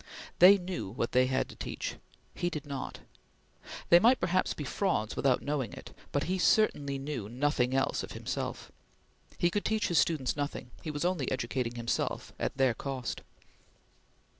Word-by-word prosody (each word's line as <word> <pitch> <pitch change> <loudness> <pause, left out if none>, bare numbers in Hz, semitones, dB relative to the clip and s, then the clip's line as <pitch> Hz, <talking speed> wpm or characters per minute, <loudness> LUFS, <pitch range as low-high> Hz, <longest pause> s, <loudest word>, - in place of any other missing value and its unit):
They 190 +3 +9
knew 180 - -4
what 115 +3 -2
they 130 0 +4
had 130 0 0
to - - -10
teach; - - -5 0.4
he 175 - -1
did 150 -4 -5
not. 140 -2 -5 0.9
They 170 - +9
might 240 +7 +5
perhaps 185 +1 +1
be 150 - -5
frauds 140 - -1
without 130 -2 +2
knowing 145 -4 -2
it; - - -11 0.2
but 145 - 0
he 180 - -1
knew 190 - -1
certainly 145 -9 +3
nothing 130 0 -1
else 135 - +1
of - - -7
himself. - - -4 0.7
He 175 - +2
could 205 - -1
teach 220 -1 0
his 170 -4 +4
students 140 -3 +1
nothing; 145 -4 -4
he 160 - -5
was 150 +2 -2
only 175 -7 0
educating 125 -1 -2
himself 120 0 -2
at - - -2
their 130 -3 +4
cost. 130 -1 -4
140 Hz, 165 wpm, -30 LUFS, 130-175 Hz, 0.9 s, They